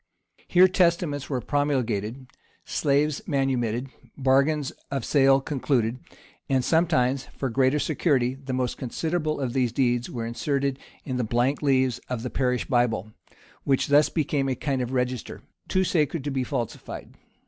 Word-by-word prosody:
Here 185 +1 +6
testaments 170 -6 +1
were 130 -4 -1
promulgated, 130 -4 -1 0.4
slaves 145 0 +1
manumitted, 130 -3 0 0.3
bargains 140 +2 +2 0.2
of 135 -4 -3
sale 135 -2 +4
concluded, 130 -4 -1 0.5
and 130 -2 +2
sometimes, 135 -6 +2
for 135 -3 -2
greater 130 +3 +3
security, 140 -5 +1
the 135 0 -8
most 125 -1 -2
considerable 155 +4 -2
of 130 -4 -2
these 125 -3 +1
deeds 120 -1 +1
were 115 -2 -4
inserted 135 +3 -1 0.3
in 130 -3 -2
the 125 - 0
blank 120 +5 +1
leaves 130 -4 +2
of 125 -3 -3
the 125 - -4
parish 125 -2 0
Bible, 115 -4 0 0.5
which 135 0 +1
thus 145 +1 +5
became 145 -3 0
a 130 - 0
kind 135 0 -1
of 125 0 -3
register, 125 -1 -2 0.2
too 185 - +2
sacred 160 -4 0
to 145 - -3
be 135 -1 0
falsified. 120 -2 -5
135 Hz, 150 wpm, -25 LUFS, 125-145 Hz, 0.5 s, Here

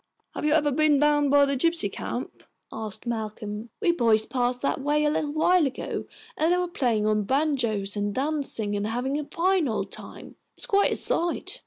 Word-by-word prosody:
"Have - - -4
you 300 - +3
ever 300 -2 +3
been 300 +1 +3
down 295 -1 +3
by 285 0 +5
the 280 0 -1
gypsy 330 +5 +1
camp?" - - -6 0.3
asked 215 -1 -6
Malcolm. 215 -1 -5
"We 350 - +4
boys 230 -8 +2
passed 245 +1 -1
that 275 - 0
way 295 +2 +1
a 295 - +2
little 295 -1 -2
while 325 0 +3
ago, 265 - -5 0.3
and 325 -2 +1
they 355 - +3
were 360 0 0
playing 240 -10 0
on 215 0 +2
banjos 235 -6 0
and 205 0 -1
dancing, 265 -6 -1
and 205 +1 -2
having 255 +6 -2
a 300 - -5
fine 360 0 +1
old 220 - -3
time. - - -9 0.2
It's - - +1
quite 405 -5 +2
a - - 0
sight." 345 +8 +1
280 Hz, 195 wpm, -25 LUFS, 220-310 Hz, 0.3 s, by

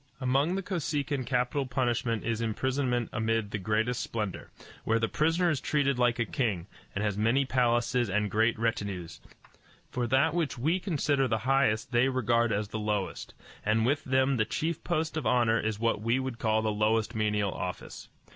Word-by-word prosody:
Among 135 +6 +1
the 195 - -2
Kosekin 145 -7 -2
capital 125 +2 0
punishment 120 -2 -1
is 115 0 -1
imprisonment 125 +1 -1
amid 110 -2 0
the 110 - -2
greatest 110 +5 0
splendor, 105 -4 -4 0.3
where 115 - +2
the 115 0 +1
prisoner 165 +5 +2
is 145 - -2
treated 140 -3 +1
like 120 -1 +3
a 115 - 0
king, 105 -7 -1 0.3
and 100 - -1
has 105 -1 -1
many 120 +6 +3
palaces 120 -2 +1
and 105 +1 0
great 115 +2 +2
retinues; 100 - -3 0.7
for 125 -1 -1
that 135 +6 +3
which 165 -6 -1
we 160 +10 +1
consider 145 -7 +1
the 110 - +1
highest 130 -5 +2
they 120 +2 +3
regard 120 -2 +1
as 105 0 -1
the 110 - -4
lowest, 105 -2 -3 0.3
and 110 +1 +2
with 145 +4 +1
them 130 0 +2
the 110 - +3
chief 165 +5 -2
post 160 -1 -1
of 155 - -1
honor 115 -2 +3
is 110 -1 -2
what 115 -2 0
we 115 +3 +1
would 130 -3 -4
call 110 -1 +1
the 110 - +1
lowest 110 +1 +1
menial 105 -2 0
office. 90 0 -6
120 Hz, 180 wpm, -29 LUFS, 110-135 Hz, 0.7 s, like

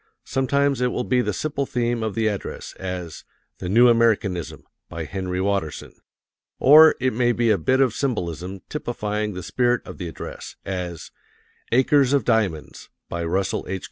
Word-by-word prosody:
Sometimes 140 0 +1
it 125 - +3
will 125 - -2
be 125 -1 +2
the - - -1
simple 140 -3 -2
theme 120 -1 -1
of 110 -2 -3
the 115 - 0
address, 105 -3 -4
as 90 -4 -6 0.4
"The 90 - -4
New 120 +5 +6
Americanism," 110 -7 +1 0.3
by 85 -1 -5
Henry 90 +1 -4
Watterson; 95 -5 -2 0.7
or 155 +3 +8
it 130 0 0
may 120 +1 +2
be 120 -1 +2
a 105 - +3
bit 130 +11 +2
of 130 -5 +3
symbolism 95 - -3
typifying 105 -7 -3
the 90 - -6
spirit 120 +6 +1
of - - -10
the 90 - -4
address, 80 - -8
as 90 -4 -5 0.6
"Acres 135 +2 +4
of 140 - +2
Diamonds," 100 -11 -1 0.2
by 85 0 -3
Russell 95 +5 -1
H. 95 - -2
110 Hz, 165 wpm, -23 LUFS, 90-125 Hz, 0.7 s, or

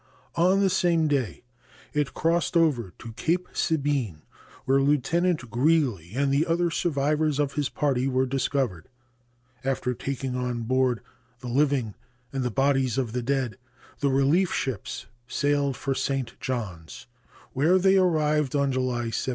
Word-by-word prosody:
On 185 +4 +3
the 195 - +3
same 170 -3 +2
day 140 -6 -1 0.5
it 150 -2 -1
crossed 170 +1 +1
over 135 - +2
to 115 -2 -9
Cape 175 +9 0
Sabine, 140 - -1 0.4
where 135 +1 +3
Lieutenant 150 0 +1
Greely 125 - +1
and 140 0 +1
the 150 +5 +2
other 170 +1 +1
survivors 150 -2 +1
of 145 -1 0
his 145 -2 -1
party 135 -3 0
were 130 0 +1
discovered. 130 - -1 0.8
After 130 -1 -1
taking 130 +1 -4
on 125 -2 -2
board 130 0 +1 0.4
the 125 - -6
living 135 -4 +1 0.4
and 135 - -1
the 125 - 0
bodies 135 0 +1
of 125 -4 -1
the 125 - -1
dead, 130 -1 -1 0.4
the 140 - +1
relief 140 +7 +3
ships 130 -8 -3 0.2
sailed 145 0 0
for 135 - -1
St. 135 -3 -2
Johns, 95 -11 -5 0.5
where 155 +8 +4
they 190 +1 +4
arrived 155 -6 +2
on 140 -1 +2
July 125 -3 -1
17. 120 - -2
135 Hz, 145 wpm, -26 LUFS, 125-155 Hz, 0.8 s, where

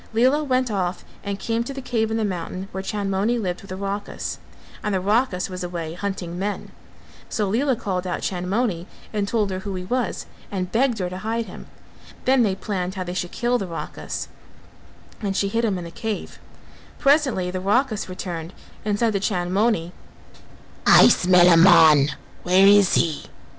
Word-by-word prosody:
Lela 260 +6 +3
went 255 -3 0
off 185 -3 -2 0.2
and 200 -1 -3
came 230 +3 -1
to 275 +3 -7
the - - -5
cave 230 -4 -1
in 225 - -1
the 220 - 0
mountain 185 0 -4
where 190 - -4
Chandmoni 200 +3 -1
lived 180 -5 -3
with 195 - -14
the 185 - -4
Rakhas; 200 +1 -4 0.4
and 210 -2 0
the - - +1
Rakhas 205 -1 +1
was 185 -1 -6
away 170 -2 -4
hunting 180 -2 -4
men, 205 +1 -3 0.6
so 210 -2 -1
Lela 255 +7 +1
called 190 -5 -3
out 180 - -3
Chandmoni 185 0 -1 0.3
and 205 -2 -1
told 210 -2 0
her 185 - -3
who 195 0 -5
he 180 - -4
was 245 +1 -2 0.2
and 185 -2 -3
begged 245 0 +2
her 185 -3 -2
to 185 - -5
hide 225 +3 -2
him; - - -11 0.6
then 260 0 +4
they 200 -5 +2
planned 190 -2 -3
how 185 - -3
they 180 0 -5
should 175 -1 -3
kill 245 +1 0
the 195 - -4
Rakhas, 165 -1 -5 0.9
and 195 -2 -2
she 200 - +1
hid 230 +3 0
him 205 -5 +1
in 175 - -5
the 170 - -8
cave; 220 +2 -5 0.6
presently 275 - +2
the 185 0 -4
Rakhas 215 +1 +1
returned 175 -2 -6 0.3
and 205 -1 0
said 225 0 +1
to 200 - +1
Chandmoni 190 -1 0 1.0
"I - - +9
smell 180 -1 +5
a 175 - +7
man: 155 -5 +7 0.3
where 185 +2 +4
is 200 -1 +6
he?" 160 -3 0
195 Hz, 185 wpm, -23 LUFS, 180-225 Hz, 1.0 s, I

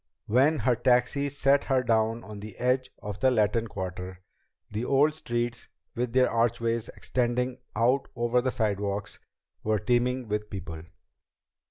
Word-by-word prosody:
When 135 +8 +3
her 125 -3 +2
taxi 125 +3 +2
set 140 0 +2
her 130 -2 +2
down 115 0 +1
on 105 -1 -9
the 105 -1 -9
edge 130 +1 +1
of 105 -1 -5
the 130 - +4
Latin 115 -1 +2
Quarter, 95 -2 -6 0.5
the 105 +3 -2
old 140 +4 +3
streets, 120 -5 -3 0.3
with 120 -2 -2
their 130 0 +5
archways 115 0 0
extending 125 +1 -1 0.2
out 125 +5 +2
over 120 +1 +2
the 130 +1 0
sidewalks, 100 -2 -2 0.4
were 110 0 +1
teeming 125 +3 +1
with 105 0 -2
people. 90 -5 -6
120 Hz, 145 wpm, -28 LUFS, 105-125 Hz, 0.5 s, their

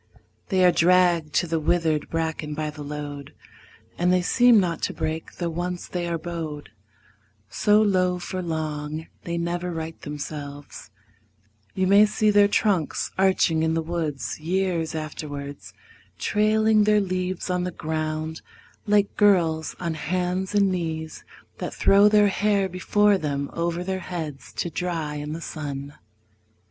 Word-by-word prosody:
They 185 -3 +3
are 180 - +7
dragged 175 -3 +3
to 175 - +2
the 165 0 0
withered 160 -1 +1
bracken 160 -2 -2
by 155 0 -3
the 150 0 -10
load, 145 -1 -7 0.6
And 180 +1 +3
they 180 -1 +3
seem 240 +3 +5
not 175 -3 -1
to - - -2
break; 160 +1 -3
though 170 -2 -3
once 175 +2 -4
they 175 -1 -3
are 170 -1 -1
bowed 160 -3 -6 0.8
So 210 +1 +3
low 185 -3 +2
for 185 +1 -4
long, 155 -2 -3 0.2
they 170 0 -2
never 175 +1 -2
right 160 -1 -6
themselves: 145 -1 -7 0.9
You 190 - +1
may 200 +3 +6
see 210 0 +2
their 205 0 +6
trunks 200 -6 0
arching 185 -4 +3
in 160 0 +1
the 165 - 0
woods 160 -5 -3
Years 170 -1 -1
afterwards, 145 -2 -6 0.5
trailing 215 0 +3
their 210 0 +4
leaves 185 -1 -2
on 180 0 0
the 180 - -1
ground 155 -1 -3 0.5
Like 205 -1 +2
girls 170 -6 +3
on 170 -2 -2
hands 180 +5 -2
and 200 -2 +4
knees 160 -3 -4 0.4
that - - -4
throw 200 +1 +5
their 210 -1 +5
hair 200 -1 +1
Before 200 +2 +2
them 140 -2 -3
over 170 +1 -2
their 190 0 -2
heads 160 -6 -6
to 170 - -3
dry 160 -3 -3
in 150 +1 -5
the 165 - -6
sun. 145 -3 -6
170 Hz, 150 wpm, -24 LUFS, 155-185 Hz, 0.9 s, are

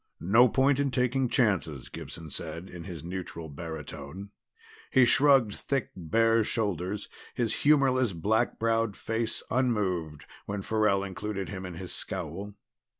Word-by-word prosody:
"No 115 +8 +5
point 135 +3 +3
in 140 -1 +2
taking 125 0 +1
chances," 95 - +1
Gibson 80 -3 -8
said 85 +6 -6
in 85 -2 -8
his 85 -6 -7
neutral 85 -2 -6
baritone. 80 +4 -7 0.6
He 130 -2 +6
shrugged 135 -4 +5
thick 135 +2 -2
bare 115 +6 +3
shoulders, 100 -2 -2 0.3
his 115 -2 0
humorless 135 -5 +4
black 105 +7 +1
browed 115 -2 +1
face 115 0 -2
unmoved, 95 - 0 0.2
when 100 -1 -3
Farrell 105 -2 +2
included 100 0 -4
him 95 -2 -5
in 90 - -7
his 90 +1 -7
scowl. 95 +3 -5
105 Hz, 135 wpm, -29 LUFS, 90-115 Hz, 0.6 s, He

